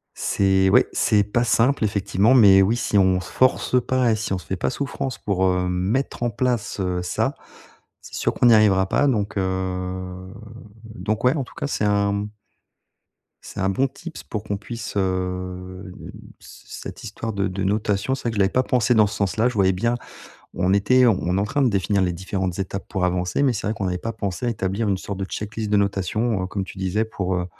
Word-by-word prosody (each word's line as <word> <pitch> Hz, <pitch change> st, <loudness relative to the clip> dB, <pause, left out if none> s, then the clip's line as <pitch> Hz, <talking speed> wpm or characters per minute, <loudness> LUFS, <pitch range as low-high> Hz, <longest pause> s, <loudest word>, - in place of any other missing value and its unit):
C'est 95 Hz, -1 st, +2 dB
ouais, -, -, +5 dB
c'est 105 Hz, -1 st, +3 dB
pas 105 Hz, +4 st, 0 dB
simple, 120 Hz, +2 st, +2 dB
effectivement, 100 Hz, +3 st, +2 dB
mais 100 Hz, -6 st, +7 dB
oui, 110 Hz, +5 st, +2 dB
si 105 Hz, -3 st, +1 dB
on 95 Hz, -1 st, +3 dB
se 90 Hz, -, -9 dB
force 130 Hz, 0 st, +2 dB
pas 130 Hz, -2 st, +2 dB
et -, -, +1 dB
si 110 Hz, -2 st, -3 dB
on 95 Hz, -, 0 dB
se -, -, -13 dB
fait 95 Hz, -, -3 dB
pas -, -, -1 dB
souffrance 135 Hz, -1 st, -4 dB
pour, 95 Hz, -2 st, -1 dB
hem, 90 Hz, 0 st, -1 dB
mettre 100 Hz, +10 st, -1 dB
en 120 Hz, -, +1 dB
place, 120 Hz, -2 st, -1 dB
heu, 90 Hz, -1 st, -1 dB
ça, 90 Hz, -, -1 dB, 0.7 s
c'est -, -, -11 dB
sûr -, -, 0 dB
qu'on -, -, +1 dB
n'y 120 Hz, -, +7 dB
arrivera 100 Hz, -3 st, +4 dB
pas 145 Hz, -, +2 dB
donc 105 Hz, -6 st, -1 dB
heu, 95 Hz, 0 st, -3 dB, 0.5 s
donc 110 Hz, -1 st, -4 dB
ouais, 125 Hz, -, +4 dB
en 140 Hz, -, -1 dB
tout -, -, -15 dB
cas, 150 Hz, -4 st, -3 dB
c'est 110 Hz, -, -1 dB
un, 100 Hz, 0 st, +2 dB
mmh 105 Hz, +1 st, -3 dB, 1.1 s
c'est -, -, -8 dB
un 95 Hz, -, +1 dB
bon 130 Hz, +8 st, +1 dB
tips 170 Hz, +5 st, -10 dB
pour 105 Hz, -, -5 dB
qu'on 105 Hz, -1 st, -3 dB
puisse, 115 Hz, +3 st, -7 dB
heu 90 Hz, 0 st, -3 dB
n -, -, -10 dB, 0.3 s
c -, -, -15 dB, 0.2 s
cette -, -, -9 dB
histoire 115 Hz, +1 st, -5 dB
de 100 Hz, -1 st, -1 dB
de 95 Hz, +1 st, -3 dB
notation, 105 Hz, +4 st, 0 dB
c'est 135 Hz, -, -7 dB
vrai 120 Hz, -, -1 dB
que -, -, -6 dB
je -, -, -1 dB
l'avais 95 Hz, -, +4 dB
pas 130 Hz, -, +2 dB
pensée 125 Hz, -1 st, +2 dB
dans 110 Hz, -2 st, +5 dB
ce 105 Hz, -, -5 dB
sens-là. 105 Hz, +4 st, +1 dB
Je 125 Hz, -, -5 dB
voyais 95 Hz, -2 st, +3 dB
bien 115 Hz, +6 st, 0 dB, 0.6 s
on 95 Hz, +1 st, +1 dB
était 125 Hz, +6 st, +4 dB
on 95 Hz, -5 st, +1 dB
est -, -, +2 dB
en -, -, +1 dB
train 140 Hz, +7 st, -1 dB
de 130 Hz, -, +4 dB
définir 100 Hz, -1 st, +1 dB
les 90 Hz, -1 st, +1 dB
différentes 95 Hz, 0 st, -3 dB
étapes 95 Hz, 0 st, -4 dB
pour 95 Hz, -3 st, -2 dB
avancer, 90 Hz, +6 st, 0 dB
mais 135 Hz, -, +4 dB
c'est 100 Hz, -, -3 dB
vrai 105 Hz, -, 0 dB
qu'on 100 Hz, -2 st, -4 dB
n'avait 90 Hz, -1 st, -1 dB
pas 115 Hz, +5 st, -5 dB
pensé 100 Hz, +3 st, -4 dB
à 120 Hz, -, +1 dB
établir 100 Hz, 0 st, -2 dB
une 95 Hz, -, +1 dB
sorte 100 Hz, +1 st, -6 dB
de 95 Hz, -, -2 dB
check-list 105 Hz, +2 st, -5 dB
de 105 Hz, -, +3 dB
notation, 100 Hz, +2 st, 0 dB
heu, -, -, -3 dB
comme 100 Hz, 0 st, -3 dB
tu 95 Hz, -, -11 dB
disais 95 Hz, +3 st, 0 dB
pour, 95 Hz, -4 st, -3 dB
heu, 90 Hz, 0 st, -1 dB
100 Hz, 230 wpm, -22 LUFS, 95-115 Hz, 1.1 s, mais